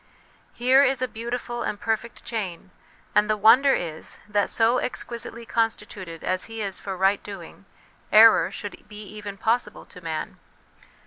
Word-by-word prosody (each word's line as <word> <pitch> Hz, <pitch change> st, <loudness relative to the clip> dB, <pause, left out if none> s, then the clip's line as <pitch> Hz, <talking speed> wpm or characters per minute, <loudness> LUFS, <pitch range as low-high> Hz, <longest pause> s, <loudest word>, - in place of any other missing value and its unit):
Here 260 Hz, +3 st, +5 dB
is 265 Hz, -2 st, +2 dB
a -, -, +1 dB
beautiful 240 Hz, +1 st, -5 dB
and 205 Hz, -, -3 dB
perfect 225 Hz, +1 st, -3 dB
chain, 190 Hz, -6 st, -4 dB, 0.4 s
and 210 Hz, +1 st, +3 dB
the 215 Hz, -, +2 dB
wonder 260 Hz, +6 st, +6 dB
is 160 Hz, -2 st, -5 dB
that, 205 Hz, -1 st, +1 dB
so 230 Hz, +2 st, +3 dB
exquisitely 235 Hz, -1 st, -5 dB
con 225 Hz, 0 st, +2 dB
stituted 185 Hz, -6 st, -9 dB
as 185 Hz, 0 st, -1 dB
he 225 Hz, 0 st, -8 dB
is 195 Hz, -2 st, -3 dB
for 195 Hz, -2 st, -5 dB
right 195 Hz, +2 st, +2 dB
doing, 195 Hz, -1 st, -10 dB, 0.5 s
error 225 Hz, +1 st, +7 dB
should 205 Hz, -, -8 dB
be 210 Hz, 0 st, -9 dB
even 205 Hz, -1 st, -8 dB
possible 220 Hz, 0 st, -1 dB
to 180 Hz, -, -13 dB
man. 160 Hz, -2 st, -5 dB
215 Hz, 155 wpm, -25 LUFS, 195-235 Hz, 0.5 s, error